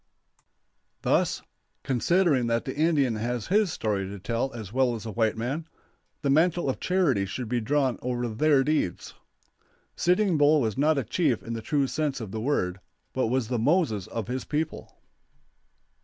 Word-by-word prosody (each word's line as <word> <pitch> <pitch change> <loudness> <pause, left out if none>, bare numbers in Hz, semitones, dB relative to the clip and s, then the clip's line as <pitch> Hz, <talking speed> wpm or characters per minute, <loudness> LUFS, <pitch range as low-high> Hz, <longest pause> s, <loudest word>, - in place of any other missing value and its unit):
Thus, - - +1 0.4
considering 140 0 +2
that 115 0 0
the 130 - -4
Indian 145 -7 +2
has 120 0 -2
his 205 -1 +3
story 100 -6 -1
to 100 +1 -7
tell 115 +7 -2
as 110 -4 -8
well 130 -2 +2
as 110 - -7
the 110 - -5
white 110 0 0
man, 135 +8 -3 0.6
the 140 - +1
mantle 165 0 +3
of - - -8
charity 150 - +1
should 120 +5 -5
be 120 +1 -1
drawn 135 +1 +1
over 125 -1 -2
their 135 +5 +3
deeds. 150 - -1 0.8
Sitting 180 -1 +2
Bull 150 +1 +5
was 110 -6 -1
not 150 +2 +2
a 135 - +1
chief 125 - 0
in 115 - -5
the 115 - -4
true 140 +4 +1
sense 145 0 -2
of 110 -5 -6
the 110 0 -4
word, 100 -8 0 0.3
but 130 -3 0
was 125 -1 0
the 120 -1 -1
Moses 125 - +1
of 115 -3 -4
his 130 +2 -3
people. 155 +1 -3
130 Hz, 170 wpm, -27 LUFS, 115-150 Hz, 0.8 s, Bull